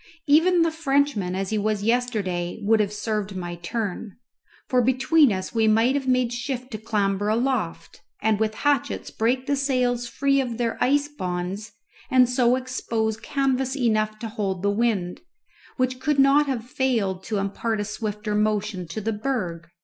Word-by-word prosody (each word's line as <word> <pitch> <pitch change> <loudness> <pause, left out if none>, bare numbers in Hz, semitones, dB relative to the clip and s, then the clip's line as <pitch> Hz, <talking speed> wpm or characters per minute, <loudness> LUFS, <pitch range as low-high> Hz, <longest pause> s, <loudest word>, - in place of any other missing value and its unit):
Even 330 +4 +5
the 330 - +1
Frenchman 280 - 0
as 195 +1 -3
he 215 - +1
was 210 -1 -1
yesterday 210 -7 -1
would 220 +2 +3
have 205 -1 +1
served 210 -1 -3
my 175 -1 -4
turn, 205 +2 -4 0.5
for 255 -2 +3
between 260 +3 +4
us 185 -1 -3
we 225 -1 +2
might 225 +4 +4
have 275 -1 -2
made 250 -2 +2
shift 250 +1 -4
to 215 - -5
clamber 205 -2 0
aloft, 230 -5 -1 0.2
and 215 -1 +1
with 215 0 0
hatchets 290 -3 0
break 250 +4 0
the 285 - +1
sails 250 -3 0
free 275 +2 +1
of 240 -3 -4
their 235 -2 -1
ice 285 +2 +2
bonds, 190 -4 -4 0.4
and 255 -1 +5
so 250 0 +3
expose 230 -4 -2
canvas 265 +2 -1
enough 215 -4 +1
to 225 - -5
hold 195 -4 -3
the 200 - +2
wind, 205 -5 -1 0.6
which 255 -1 0
could 295 +2 0
not 275 +2 +5
have 245 -4 -2
failed 225 -8 -1
to 215 - -2
impart 205 +3 -2
a 205 - -1
swifter 210 0 -4
motion 210 -3 0
to 195 +7 -5
the 225 +2 -1
berg. 205 -8 -3
225 Hz, 170 wpm, -24 LUFS, 205-260 Hz, 0.6 s, Even